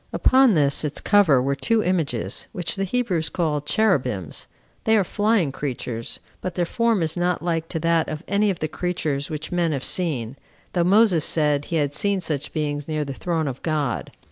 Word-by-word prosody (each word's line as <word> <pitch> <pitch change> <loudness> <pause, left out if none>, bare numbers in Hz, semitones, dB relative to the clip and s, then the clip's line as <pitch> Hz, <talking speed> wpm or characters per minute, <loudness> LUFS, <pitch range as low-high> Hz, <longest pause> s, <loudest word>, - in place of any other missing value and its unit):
Upon 260 -5 +4
this 140 -2 +2
its 150 -1 -1
cover 195 -10 +4
were 140 +1 +1
two 220 +9 +1
images, 140 - -1
which 180 -5 -3
the 195 - -1
Hebrews 190 -7 0
call 155 -5 -1
Cherubims; 135 - 0 0.4
they 220 0 +4
are 200 - +3
flying 205 -4 +1
creatures, 125 -4 -4 0.2
but 180 -2 -4
their 175 - +1
form 230 -1 +1
is 160 0 0
not 175 -1 0
like 165 -2 -1
to 160 - -2
that 165 -1 +2
of 155 0 -5
any 205 +2 +2
of 190 - -1
the 155 - -2
creatures 155 -4 -2
which 155 +2 -5
men 170 -3 +1
have 135 -2 -3
seen, 140 - 0 0.4
though 175 - +2
Moses 190 -3 +4
said 150 -2 +1
he 170 - -4
had 145 -3 0
seen 200 +5 0
such 155 -5 -3
beings 145 -2 -2
near 155 -1 -1
the 140 - -5
throne 160 +1 -2
of 130 -2 -5
God. 150 -6 -2
160 Hz, 195 wpm, -23 LUFS, 145-185 Hz, 0.4 s, Upon